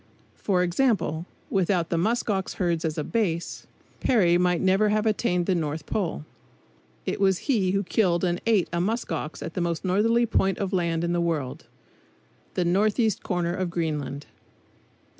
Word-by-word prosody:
For 185 -3 +1
example, 180 - 0 0.2
without 180 -3 +1
the 170 - +1
musk 230 +7 0
ox 195 -3 -1
herds 170 -3 0
as 160 -2 -2
a 150 - -1
base, 175 -5 -2 0.3
Peary 190 -9 +3
might 180 0 +2
never 195 +3 +3
have 215 +1 +1
attained 200 -5 +1
the 190 - +2
North 155 -3 -2
Pole. 170 -6 -2 0.8
It - - -2
was 190 -2 +4
he 220 -10 +2
who 195 +2 +1
killed 180 -2 +1
and 175 -1 0
ate 215 -6 +3
a 170 - +1
musk 220 +4 -2
ox 160 -1 -4
at 165 - -6
the 180 - -2
most 170 +1 -2
northerly 225 +6 +3
point 195 -4 +1
of 195 0 -3
land 170 -2 0
in 170 0 0
the 175 - +1
world, 155 -7 -2 0.9
the 180 - +1
northeast 210 +4 +2
corner 175 -1 -1
of 185 0 -2
Greenland. 150 -4 -3
180 Hz, 170 wpm, -25 LUFS, 170-205 Hz, 0.9 s, was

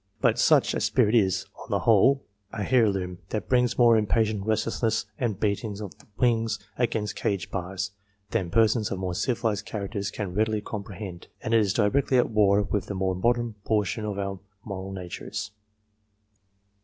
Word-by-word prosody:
But - - +2
such - - +4
a - - -1
spirit 105 - +2
is, 95 -5 +3
on - - -11
the - - 0
whole, 135 +5 +4 0.3
an 105 -2 -3
heirloom 100 -8 +2
that 105 -3 -3
brings 125 -1 +2
more 120 -2 +6
impatient 110 -1 +1
restlessness 110 0 0
and 115 -7 -1
beating 105 0 -1
of 105 -4 -7
the - - -20
wings 115 -2 +2 0.2
against 110 -4 -1
cage 100 -3 -2
bars, 95 0 -3 0.4
than 90 -3 0
persons 110 +2 +3
of 95 - -3
more 95 -1 -3
civilized 110 +1 -1
characters 100 -1 -3
can 100 -3 -5
readily 110 +2 +1
comprehend, 100 -3 -7 0.2
and 110 - -1
it 115 - +6
is 100 -3 +2
directly 125 +6 +2
at 120 - +2
war 105 -1 +4
with 100 -2 -2
the 100 - -4
more 95 0 0
modern 120 +4 +1
portion 105 0 0
of 105 -2 -3
our 100 -1 -3 0.3
moral 95 -2 -5
natures. 95 +3 -6
105 Hz, 165 wpm, -26 LUFS, 95-115 Hz, 0.4 s, more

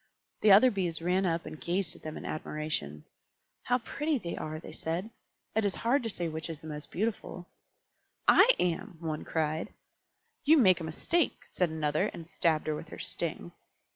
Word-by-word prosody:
The 210 - +6
other 220 +6 +8
Bees 180 -5 0
ran 180 +3 +1
up 165 0 -1
and 155 0 -8
gazed 175 -1 0
at - - -15
them 155 0 -6
in - - -8
admiration. 150 - -4 0.6
"How 250 - +3
pretty 295 +5 -1
they 175 -8 -5
are!" 155 0 -5
they - - -10
said. 175 +7 -3 0.4
"It 220 - +3
is 200 -2 0
hard 265 +5 +4
to 230 - -3
say 175 -5 -2
which 160 +1 -4
is 160 -3 -5
the 160 - -14
most 150 -1 -2
beautiful." 200 -3 -3 0.8
"I - - +7
am!" 180 +2 -1
one 155 -2 -3
cried. 155 0 -1 0.7
"You 315 +3 +6
make 190 - +6
a - - -5
mistake," 295 - 0
said 180 -2 +1
another, 155 +3 0
and 165 - -8
stabbed 165 -3 +1
her 155 - 0
with - - -8
her - - -8
sting. - - -3
170 Hz, 185 wpm, -30 LUFS, 155-200 Hz, 0.8 s, other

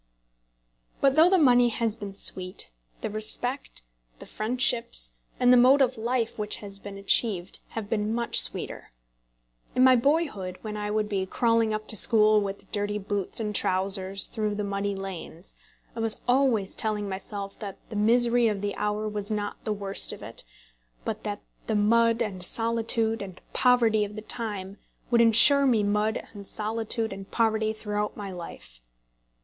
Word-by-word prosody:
But 275 -1 +3
though 320 +3 +6
the 380 - +4
money 245 -6 +5
has 225 -1 -1
been 205 -3 -8
sweet, 185 - +1 0.3
the - - -3
respect, 220 - -1 0.3
the - - -11
friendships, 230 - -1 0.3
and 250 0 +5
the - - +7
mode 255 +3 +6
of 260 -2 +2
life 230 0 -2
which 210 0 -2
has 200 -1 -9
been 200 0 -9
achieved, 195 -2 +1 0.2
have 220 -2 -4
been 210 0 -1
much 235 +1 +3
sweeter. - - -1 0.9
In 255 - +4
my 260 0 +7
boyhood, 245 - 0
when 215 -1 -5
I 210 0 -4
would 215 0 -1
be 195 -2 -2
crawling 230 +1 +1
up 215 0 -4
to - - 0
school 215 0 +5
with 200 -1 -6
dirty 205 0 -1
boots 200 0 -4
and 210 -2 -3
trousers 190 0 +1
through 215 -2 -3
the 210 - -3
muddy 200 0 -2
lanes, 190 -2 -6 0.4
I - - -6
was 225 -1 +1
always 245 -6 +2
telling 210 -2 -2
myself 195 +1 -6
that 200 -3 -7
the - - -6
misery 235 +2 +3
of 205 -3 -2
the 205 0 -2
hour 210 +1 -2
was 210 -1 -5
not 210 -1 -4
the 215 - -1
worst 200 -1 0
of - - -9
it, - - -9 0.6
but - - -4
that - - -4 0.3
the 220 - 0
mud 230 +2 +3
and 190 -5 -6
solitude 225 +1 0
and 190 -3 -8
poverty 235 -4 +3
of 205 0 -6
the 215 - -7
time 205 -4 -5 0.3
would 235 -1 +5
insure 270 +5 +7
me 225 -5 +2
mud 210 +1 -1
and 200 -2 -10
solitude 220 +1 -2
and 195 0 -10
poverty 220 -1 +1
through 210 -1 -3
my 200 -2 -6
life. 165 - -10
215 Hz, 170 wpm, -26 LUFS, 200-230 Hz, 0.9 s, the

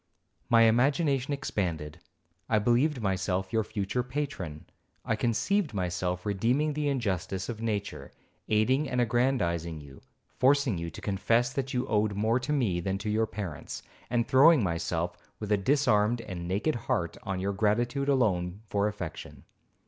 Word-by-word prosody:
My 115 -1 +6
imagination 135 +4 +2
expanded. 90 - -3 0.5
I 110 - +3
believed 120 +5 +2
myself 95 -1 -1
your 110 -1 +2
future 105 +3 -2
patron, 125 - -5 0.4
I 110 - +1
conceived 135 - 0
myself 90 0 -2
redeeming 120 +10 +1
the 150 0 0
injustice 95 -7 -2
of 115 -2 -5
nature, 105 -3 -3 0.4
aiding 130 +7 +2
and 125 - -1
aggrandizing 100 -10 +1
you, 70 -2 -13 0.4
forcing 135 - +3
you 85 0 -4
to - - -10
confess 115 +5 +1
that 135 -1 -3
you 125 - 0
owed 105 -1 +1
more 110 +4 +2
to 130 +4 -4
me 115 -12 +1
than 95 +2 -2
to 105 +2 -3
your 110 +1 +1
parents, 95 -9 -6 0.3
and 120 -1 +1
throwing 140 +1 +6
myself, 85 0 -2 0.2
with 105 -1 -5
a 105 - +5
disarmed 120 -1 +2
and 90 -5 -6
naked 100 - 0
heart, 90 - -2
on 95 -1 -3
your 100 +2 -1
gratitude 120 +7 +1
alone 100 -7 +1
for 100 0 +1
affection. 100 -6 -7
110 Hz, 150 wpm, -29 LUFS, 95-130 Hz, 0.5 s, My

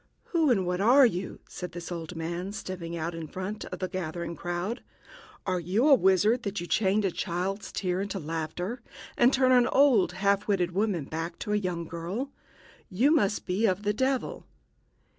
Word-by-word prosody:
"Who 325 -4 +3
and 195 -7 +3
what 180 +1 -1
are 255 +6 +7
you?" 185 -4 -2
said 180 -1 -7
this 175 +1 -7
old 170 0 -5
man, 170 +4 -4
stepping 180 -5 -5
out 165 +1 -3
a - - -7
little - - -5
in 160 - -6
front 190 +3 -5
of - - -6
the 185 - -2
gathering 170 -2 -4
crowd. 175 +8 -3 0.6
"Are 185 -2 0
you 190 - +1
a 295 - +8
wizard, 210 +2 +4
that 200 -3 -3
you 175 - -4
change 200 +2 +2
a 190 - +1
child's 185 +5 -3
tears 185 -1 -1
into 200 - -4
laughter, 165 +7 -4 0.3
and 245 +1 +5
turn 260 -1 +3
an 245 -1 +5
old 265 -8 +4
half 200 +1 +1
witted 180 -4 +1
woman 190 -5 0
back 165 +3 -5
to 210 - -2
a - - +3
young 180 -4 -2
girl? 175 - -4 0.6
You 240 - +3
must 205 -10 +1
be 200 +5 +1
of 190 +1 0
the 205 0 +1
devil...." 260 +3 -1
190 Hz, 195 wpm, -28 LUFS, 175-215 Hz, 0.6 s, a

